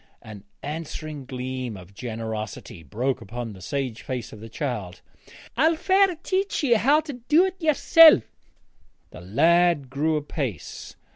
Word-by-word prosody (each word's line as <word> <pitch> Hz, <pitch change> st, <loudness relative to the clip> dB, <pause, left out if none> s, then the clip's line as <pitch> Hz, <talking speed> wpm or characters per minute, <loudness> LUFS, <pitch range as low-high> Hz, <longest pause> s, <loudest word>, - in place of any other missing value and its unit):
An 105 Hz, -3 st, -11 dB, 0.2 s
answering 155 Hz, -1 st, -6 dB
gleam 130 Hz, -3 st, -5 dB
of 95 Hz, +1 st, -14 dB
generosity 110 Hz, -5 st, -6 dB
broke 120 Hz, -, -2 dB
upon 115 Hz, +1 st, -6 dB
the 95 Hz, -, -13 dB
sage 130 Hz, +2 st, -4 dB
face 125 Hz, -3 st, -5 dB
of 110 Hz, -, -11 dB
the 115 Hz, +1 st, -10 dB
child. 110 Hz, -, -4 dB, 0.6 s
'I'll 320 Hz, +7 st, +3 dB
fair 380 Hz, +2 st, +3 dB
teach 385 Hz, -3 st, -1 dB
ye 255 Hz, -4 st, +4 dB
how 280 Hz, +7 st, +4 dB
to 305 Hz, -2 st, -7 dB
dae't 335 Hz, +10 st, +1 dB
ye'sel'.' 315 Hz, -, +7 dB, 0.9 s
The -, -, -11 dB
lad 165 Hz, -, +2 dB
grew 155 Hz, +3 st, 0 dB
apace. 140 Hz, -, -5 dB
135 Hz, 135 wpm, -24 LUFS, -, 0.9 s, ye'sel